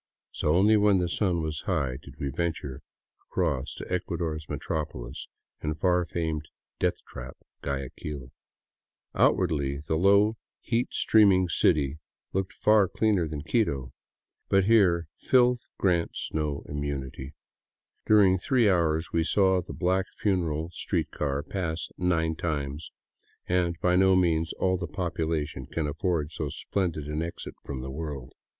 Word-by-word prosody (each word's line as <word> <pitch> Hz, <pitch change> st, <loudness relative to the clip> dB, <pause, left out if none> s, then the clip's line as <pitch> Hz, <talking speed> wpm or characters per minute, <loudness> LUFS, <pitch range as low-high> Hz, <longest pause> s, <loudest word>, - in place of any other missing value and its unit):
So 75 Hz, +1 st, +1 dB
only 105 Hz, +4 st, +5 dB
when 105 Hz, -1 st, +4 dB
the 90 Hz, -1 st, +1 dB
sun 85 Hz, -2 st, 0 dB
was 80 Hz, -1 st, -3 dB
high 65 Hz, -2 st, 0 dB
did 70 Hz, -1 st, -13 dB
we 70 Hz, -, -2 dB
venture 80 Hz, -4 st, -3 dB, 0.5 s
across 65 Hz, -2 st, -1 dB
to -, -, -8 dB
Ecuador's 85 Hz, -3 st, -2 dB
metropolis 75 Hz, -6 st, -4 dB, 0.3 s
and 75 Hz, 0 st, -3 dB
far 90 Hz, 0 st, +2 dB
famed 80 Hz, -3 st, -3 dB, 0.3 s
death -, -, 0 dB
trap, 65 Hz, 0 st, -8 dB, 0.2 s
Guayaquil. 70 Hz, 0 st, -5 dB, 0.8 s
Outwardly, 70 Hz, -2 st, +2 dB
the 80 Hz, -, +1 dB
low, 100 Hz, +5 st, +4 dB, 0.2 s
heat 120 Hz, +1 st, 0 dB
steaming 95 Hz, -4 st, +4 dB
city 75 Hz, -2 st, +2 dB, 0.3 s
looked 95 Hz, 0 st, -1 dB
far 105 Hz, -2 st, +4 dB
cleaner 95 Hz, -3 st, +1 dB
than 75 Hz, -1 st, -5 dB
Quito. 70 Hz, -, 0 dB, 0.6 s
But 95 Hz, -1 st, +4 dB
here 95 Hz, -6 st, +4 dB
filth 125 Hz, -2 st, +3 dB
grants 85 Hz, -3 st, 0 dB
no 75 Hz, -2 st, -1 dB
immunity. 70 Hz, -1 st, -5 dB, 0.7 s
During 100 Hz, -4 st, +5 dB
three 120 Hz, +2 st, +3 dB
hours 85 Hz, -4 st, +1 dB
we 85 Hz, -, +3 dB
saw 95 Hz, +1 st, +3 dB
the 85 Hz, -, -9 dB
black 95 Hz, +1 st, 0 dB
funeral 85 Hz, -5 st, 0 dB
street -, -, -2 dB
car 70 Hz, -1 st, -2 dB
pass 85 Hz, -2 st, -3 dB
nine 80 Hz, -3 st, +1 dB
times 75 Hz, -2 st, -3 dB, 0.3 s
— -, -, -39 dB
and 90 Hz, -2 st, +1 dB
by 90 Hz, 0 st, +3 dB
no 95 Hz, 0 st, +5 dB
means 85 Hz, -3 st, +2 dB
all 95 Hz, 0 st, +1 dB
the 85 Hz, -1 st, -4 dB
population 80 Hz, -3 st, -2 dB
can 80 Hz, -, -2 dB
afford 75 Hz, +1 st, -1 dB
so 75 Hz, -2 st, -3 dB
splendid 85 Hz, -2 st, -2 dB
an 75 Hz, +1 st, -3 dB
exit 85 Hz, +1 st, -5 dB
from 65 Hz, -2 st, -5 dB
the 65 Hz, +1 st, -6 dB
world. 70 Hz, -4 st, -6 dB
85 Hz, 140 wpm, -27 LUFS, 75-95 Hz, 0.8 s, only